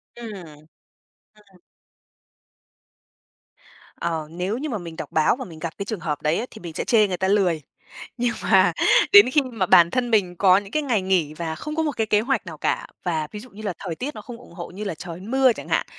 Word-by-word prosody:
Ừm. 230 -2 -8 1.0
À. 195 -4 -24 2.3
Ờ, 160 -2 -3
nếu 180 +6 -3
như 300 +4 -4
mà 230 - -2
mình 170 -4 -8
đọc - - -7
báo 155 +6 +3
và 260 0 -7
mình 160 -3 -11
gặp 165 0 -4
cái 200 - -4
trường 215 -1 -4
hợp 155 -3 -3
đấy 160 +9 0
thì 220 - -11
mình 170 -2 -7
sẽ - - -3
chê 215 -3 +4
người 185 -2 -3
ta 190 - 0
lười. 190 -5 +2 0.6
Nhưng 240 0 0
mà 185 -2 +4 0.4
đến 205 +4 +9
khi 295 - +4
mà 235 -8 -2
bản 170 -1 +6
thân 245 -2 -1
mình 190 -5 +2
có 185 0 +5
những 200 0 -5
cái 305 - 0
ngày 240 -8 +1
nghỉ 185 -5 +1
và 160 0 -4
không 305 - -6
có 320 - +1
một 295 -4 -3
cái 220 -1 0
kế 210 0 +3
hoạch 250 -2 -1
nào 165 -3 -8
cả, - - -1 0.2
và 160 -3 -1
ví 210 - -7
dụ 250 +4 -12
như 215 -1 -12
là 200 -4 -3
thời 175 -4 -5
tiết 285 - -5
nó - - -7
không 245 -3 -9
ủng 235 - -16
hộ 170 0 -7
như 195 +4 -7
là 195 -5 -3
trời 170 +2 -8
mưa 255 +4 +3
chẳng - - -9
hạn, - - +1
195 Hz, 235 wpm, -23 LUFS, 170-235 Hz, 2.3 s, đến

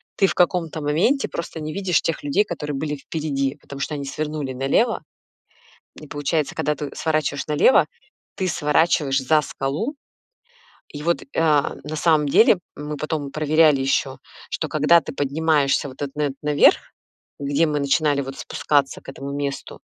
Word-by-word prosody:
ты 195 - +3
в - - -1
каком-то 170 -3 +1
моменте 165 - +1
просто 165 -1 -5
не 155 0 -4
видишь 185 -3 +1
тех 165 - -2
людей, 145 +9 +2
которые 150 -6 -4
были 150 +2 -2
впереди, 140 -2 -3
потому 140 - -10
что 150 - -2
они 140 -1 -5
свернули 150 -1 -4
налево. 135 - +1 1.0
И 155 - -10
получается, 145 +1 -1
когда 150 0 -1
ты 145 0 -5
сворачиваешь 155 -3 -1
налево, 150 - +5 0.5
ты 190 - -1
сворачиваешь 150 -3 +2
за 150 +3 +3
скалу. 150 - -3 0.9
И 145 - -8
вот, 170 +1 0
э, 275 - -5
на 150 -1 +1
самом 155 -2 +3
деле 205 +4 +5 0.2
мы 150 +1 -5
потом 150 -2 -3
проверяли 155 -1 +3
ещё, 135 0 0 0.3
что 155 - -2
когда 155 +3 +4
ты - - -7
поднимаешься 145 0 +1
вот 130 - -13
этот 140 -1 -4
на 150 - -1
этот 140 -2 -2
наверх, 150 -1 +5 0.6
где 145 +3 +1
мы 150 -1 -1
начинали 140 +1 +2
вот 135 0 -7
спускаться 145 -2 0
к - - -12
этому 135 +1 -7
месту, 140 -1 -4
150 Hz, 165 wpm, -22 LUFS, 140-160 Hz, 1.0 s, налево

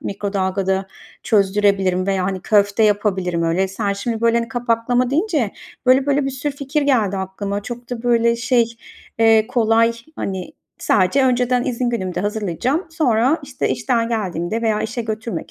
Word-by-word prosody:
mikrodalgada 190 -1 -2 0.4
çözdürebilirim 195 -3 +2
veya, 190 -2 0
hani, 190 0 -2
köfte 205 +2 +2
yapabilirim 190 -5 +1
öyle. 175 +4 +1
Sen, 200 +1 -2
şimdi, 225 +3 -3
böyle, 230 0 +3
hani, 230 0 -3
kapaklama 245 +1 0
deyince 305 - 0 0.4
böyle 265 +2 +4
böyle 285 0 +2
bir 270 - -1
sürü 265 +2 -3
fikir 285 +2 -1
geldi 225 -9 +2
aklıma. 200 +1 -4
Çok 240 +1 -8
da, 240 -2 -4
böyle, 235 -1 +2
şey, 240 0 +2 0.5
eee, 225 -1 +5
kolay, 230 -2 +3 0.2
hani, 190 -2 -4 0.3
sadece 205 +8 +2
önceden 250 0 +1
izin 245 -1 -1
günümde 185 -7 -2
hazırlayacağım. 215 - -1
Sonra, 270 -2 +2
işte, - - -3
işten 235 -3 0
geldiğimde 210 -1 -2
veya 215 -2 +1
işe 235 +2 -3
götürmek 220 +1 -5
225 Hz, 150 wpm, -20 LUFS, 195-245 Hz, 0.5 s, eee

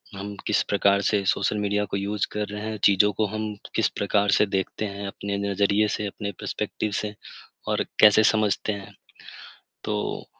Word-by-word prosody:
हम 100 +1 -6
किस 105 - +3
प्रकार 100 0 +3
से 100 0 +1
सोशल 100 +2 +1
मीडिया 105 0 0
को - - 0
यूज़ 100 +1 -1
कर 105 0 -2
रहे 105 0 -6
हैं, 110 0 -4
चीज़ों 100 +1 +5
को 110 +3 0
हम 110 +1 -4 0.2
किस - - +3
प्रकार 100 0 +1
से 105 - +4
देखते 95 +2 -2
हैं 100 0 -5
अपने 100 0 -4
नज़रिए 100 +2 +2
से, 105 0 -2
अपने 100 0 -5
पर्सपेक्टिव 105 - -3
से 105 -1 -4 0.5
और - - +1 0.2
कैसे 105 0 +7
समझते 105 -1 +2
हैं। 100 -1 -9 0.9
तो 105 -1 -3
105 Hz, 175 wpm, -25 LUFS, 100-105 Hz, 0.9 s, कैसे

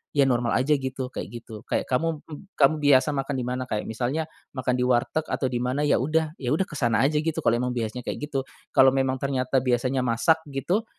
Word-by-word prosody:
ya 140 -2 +4
normal 120 -2 +1
aja 135 +5 +3
gitu 130 -1 -4
kayak - - -6
gitu 110 -2 -11
kayak - - -1
kamu 160 +4 0
m 150 +4 -9
kamu 145 +2 +5
biasa 145 -1 +4
makan 135 +1 -2
di 125 - -3
mana 125 +1 -2
kayak 105 -3 -2
misalnya 130 +8 -2 0.3
makan 130 -2 0
di 125 - +1
warteg 125 +5 +1
atau 130 - -1
di 125 - -2
mana 130 +3 -1
ya 145 - +3
udah 155 +4 0
ya 125 -3 -3
udah 185 +5 +1
ke - - -8
sana 115 -3 +2
aja 150 +2 +2
gitu 160 +1 -1
kalo 120 -5 +2
emang 125 0 -1
biasanya 120 +1 -3
kayak - - -4
gitu. 135 -2 -2 0.3
Kalo 130 0 +7
memang 130 -1 +1
ternyata 135 -1 0
biasanya 130 +1 +1
masak 120 +7 +3
gitu, 180 - -1
130 Hz, 225 wpm, -25 LUFS, 125-150 Hz, 0.3 s, Kalo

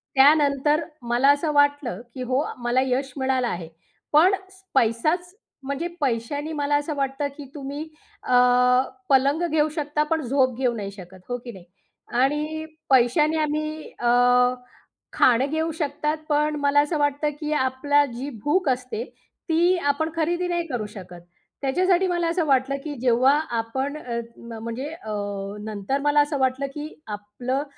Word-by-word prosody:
त्यानंतर 290 +2 +4 0.3
मला 245 +4 +4
असं 290 +2 +1
वाटलं 285 -7 +2
की 255 - -7
हो 260 +3 +2 0.2
मला 240 +1 +1
यश 265 +1 -1
मिळालं 260 -2 +1
आहे. 175 -7 -4 0.5
पण 340 +6 +6 0.2
स 380 0 -20
पैसाच 305 +10 +1 0.3
म्हणजे 280 +5 -3
पैशानी 285 +5 -1
मला 290 -1 0
असं 290 +1 -3
वाटतं 275 +1 -1
की 290 - -8
तुम्ही 285 +1 -5 0.4
अ, - - -1 0.8
पलंग 275 +5 +3
घेऊ 310 0 +2
शकता 300 -1 0
पण 320 -1 +2
झोप 260 -1 +1
घेऊ 250 -2 +1
नाही 200 -3 -5
शकत. 190 -1 -12
हो 245 - -1
की 240 0 -9
नाही, 190 -5 -13 0.6
आणि 300 +3 0 0.2
पैशाने 275 +5 +4
आम्ही 305 +1 -3
अ, 240 - +1 1.0
खाणं 250 +1 +4
घेऊ 320 +1 0
शकतात, 300 0 -2
पण 300 0 +2
मला 285 0 +4
असं 300 +2 -1
वाटतं 290 +1 +1
की 300 -1 -3
आपला 285 +1 +2
जी 260 +4 -5
भूक 305 +1 +2
असते 255 -3 -2 0.5
ती 345 +3 +4
आपण 315 +3 0
खरेदी 345 +2 0
नाही 345 -1 -1
करू 245 -7 -3
शकत. 180 -4 -11 0.4
त्याच्यासाठी 365 +7 +2
मला 345 -1 0
असं 335 -1 0
वाटलं 270 -1 +2
की 300 - -4
जेव्हा 250 +2 +4 0.3
आपण 265 +6 -2
अ, 240 -5 -4 0.2
न 235 -1 -9
म्हणजे 235 +5 -4
अ, 220 -10 -7 0.5
नंतर 215 +5 -2
मला 290 +1 +3
असं 290 0 -1
वाटलं 260 +1 +1
की 300 0 -5 0.3
आपलं 245 +7 -3
280 Hz, 155 wpm, -24 LUFS, 250-305 Hz, 1.0 s, पण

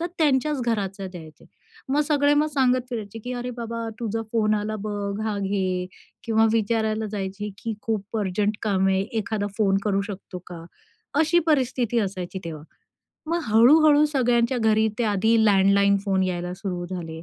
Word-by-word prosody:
तर 340 - -1
त्यांच्याच 295 -2 +2
घराचा 200 -4 -2
द्यायचे. 160 -4 -12 0.4
मग 280 +3 +2
सगळे 290 -1 +3
मग 295 +1 +3
सांगत 255 -2 +3
फिरायचे 225 -2 -5
की, 250 - -4
"अरे 245 0 -4
बाबा, 230 -1 -4
तुझा 225 -1 -2
फोन 215 -2 +2
आला 215 +1 -2
बघ, 205 0 -3
हा 215 -2 -1
घे." 190 -2 -1 0.4
किंवा 225 -1 +3
विचारायला 220 0 0
जायचे 200 +1 -4
की, 225 +1 -4
"खूप 215 -1 -3
अर्जंट 205 +1 0
काम 195 -3 +1
आहे, 190 0 +2 0.2
एखादा 215 -1 -2
फोन 195 -3 +3
करू 200 -2 +1
शकतो 195 -2 -8
का?" 170 -2 -9 0.6
अशी 320 +2 +3
परिस्थिती 255 -6 +1
असायची 190 -2 -4
तेव्हा. 155 -3 -6 0.7
मग 340 +1 +1
हळू-हळू 290 +7 +6
सगळ्यांच्या 245 -3 +1
घरी 220 -1 +3
ते 240 - +1
आधी 220 +3 +3
लँडलाईन 200 0 +4
फोन 190 -2 +1
यायला 180 -1 -3
सुरू 180 -2 -4
झाले. 165 -3 -6
215 Hz, 160 wpm, -24 LUFS, 195-240 Hz, 0.7 s, हळू-हळू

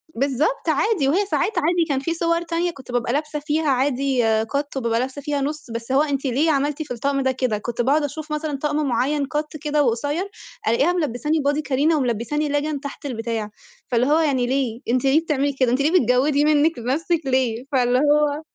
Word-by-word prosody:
بالضبط 275 +4 0
عادي، 315 0 +1
وهي 370 +9 +2
ساعات 405 - 0
عادي 340 +1 +2
كان 275 -2 +1
في 305 +5 -2
صور 335 0 0
تانية 345 +1 -1
كنت 265 -6 -12
بابقى 245 0 0
لابسة 300 +1 -2
فيها 300 +1 -1
عادي 265 -1 +1 0.2
كت، 280 +3 -3
وبابقى 230 -3 0
لابسة 265 +3 -3
فيها 290 -1 -2
نُص، 295 -2 -4
بس 230 +2 -5
هو 270 +2 +4
أنتِ 285 -2 -1
ليه 280 +5 +2
عملتِ 290 +1 0
في 290 - -6
الطقم 275 +3 -1
ده 265 0 +1
كده؟ 255 -4 -1
كنت 235 +3 -3
باقعد 285 +5 +2
أشوف 305 +2 -5
مثلًا 300 -1 -2
طقم 300 0 0
معين 275 +4 0
كت 300 +2 -4
كده 300 -1 +1
وقصير، 285 - -1 0.4
ألاقيها 275 +10 +3
ملبساني 305 -1 -1
بادي 285 +1 +1
كارينا 295 +3 +1
وملبساني 265 +3 -1
ليجن 290 0 -1
تحت 280 +1 -8
البتاع، 225 -4 -3 0.4
فاللي 245 0 +1
هو 305 +2 +4
يعني 270 -6 +1
ليه؟ 255 -3 -1
أنتِ 250 +2 +1
ليه 275 +4 +4
بتعملي 285 -3 0
كده؟ 255 -3 +1
أنتِ 255 +3 +1
ليه 300 - +2
بتجودي 275 +5 +2
منِك 305 0 +3
لنفسِك 310 +8 0
ليه 255 -3 0
فاللي 250 -2 +2
هو 295 +1 +2
285 Hz, 195 wpm, -22 LUFS, 255-305 Hz, 0.4 s, هو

